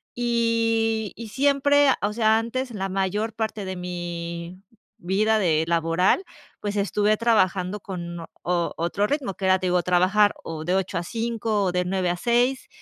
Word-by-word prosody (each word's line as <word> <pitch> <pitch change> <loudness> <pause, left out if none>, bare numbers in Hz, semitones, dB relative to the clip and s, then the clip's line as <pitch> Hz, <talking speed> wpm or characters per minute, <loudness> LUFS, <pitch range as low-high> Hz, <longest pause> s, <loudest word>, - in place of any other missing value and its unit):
y 230 -2 +1
y 230 -1 -8
siempre, 285 +3 +3 0.2
o 205 +1 0
sea, 220 -1 +3
antes, 250 +3 -2
la 195 -3 -3
mayor 195 +3 -1
parte 220 -2 -3
de 190 0 -4
mi 175 0 -6 0.4
vida 215 +5 +1
de 160 -5 +2
laboral, 170 - +2 0.4
pues, 205 0 -3
estuve 210 +1 +1
trabajando 200 -4 +1
con 175 -3 -6 0.2
o 175 -1 0
otro 175 +5 0
ritmo, 280 -7 -2
que 190 - -5
era, 185 0 +5
te 185 - -2
digo, 180 0 +2
trabajar 185 +4 +3
o 160 -1 -6
de 180 +2 +1
8:00-5:00 210 +4 -1
o 185 - +1
de 180 0 0
9:00-6:00, 195 +8 0
200 Hz, 150 wpm, -24 LUFS, 180-225 Hz, 0.4 s, era